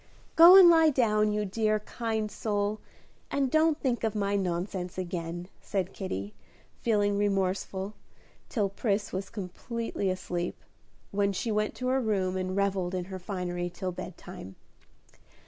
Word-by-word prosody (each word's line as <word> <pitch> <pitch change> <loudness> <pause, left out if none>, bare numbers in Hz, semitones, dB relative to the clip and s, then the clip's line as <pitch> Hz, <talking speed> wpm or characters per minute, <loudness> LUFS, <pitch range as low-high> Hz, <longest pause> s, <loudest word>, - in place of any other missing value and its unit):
"Go 340 +3 +10
and 380 -2 +10
lie 325 -2 +7
down, 215 -6 +2
you 210 0 0
dear, 215 +2 +1
kind 220 -1 -3
soul, 205 0 -1 0.5
and 275 -2 0
don't 315 0 +3
think 245 -4 -1
of 220 -1 0
my 200 -1 0
nonsense 180 -1 -2
again," 175 -1 -4
said 190 -2 -2
Kitty, 105 - -5 0.5
feeling 205 -3 +2
remorseful, 195 0 -1 0.6
till 210 -5 +1
Pris 200 +1 -1
was 190 +1 -3
comfortably 220 +1 -4
asleep, 180 -1 -3 0.5
when 200 0 +1
she 225 +4 -2
went 215 0 0
to 255 - -3
her 265 +1 +2
room 195 -5 0
and 185 0 -2
revelled 190 -2 0
in 180 -1 -2
her 185 - -4
finery 175 -2 -3
till 180 +1 -4
bedtime. 175 - -9
200 Hz, 145 wpm, -29 LUFS, 185-220 Hz, 0.6 s, Go